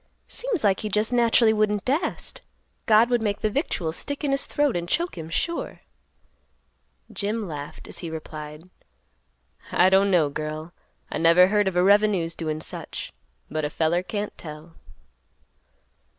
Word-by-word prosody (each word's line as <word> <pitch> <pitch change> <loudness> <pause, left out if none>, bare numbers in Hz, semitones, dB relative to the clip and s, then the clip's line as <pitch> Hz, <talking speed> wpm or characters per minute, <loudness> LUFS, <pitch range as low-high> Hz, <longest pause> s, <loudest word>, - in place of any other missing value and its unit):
Seems 475 - -2
like 195 -3 +3
he 215 - -3
just 210 +4 0
naturally 235 -2 +4
wouldn't 210 -2 +1
dast; 285 +7 -1 0.5
God 225 +2 +5
would 240 -1 +2
make 205 -2 -1
the 215 - +1
victuals 175 - -2
stick 285 +1 -3
in 285 - +1
his 275 0 0
throat 290 -3 +1
and 175 0 -3
choke 345 +3 0
him 160 -2 -7
sure." 335 - -3 1.3
Jim 210 +1 -2
laughed, 145 -3 -7
as - - -6
he 170 - -5
replied, 155 0 -8 1.0
"I 180 +1 +5
don't 195 +1 +5
know, 170 -6 +3
girl; 155 +3 -5 0.4
I - - -2
never 170 +3 +6
heard 205 -1 +2
of 190 - -1
a 180 - +4
revenue's 200 -4 +3
doin' 155 -2 -3
such. - - -6 0.3
But 155 0 -3
a 150 - 0
feller 160 +3 +1
can't 205 +2 -4
tell." 155 +1 -10
190 Hz, 155 wpm, -25 LUFS, 160-220 Hz, 1.3 s, never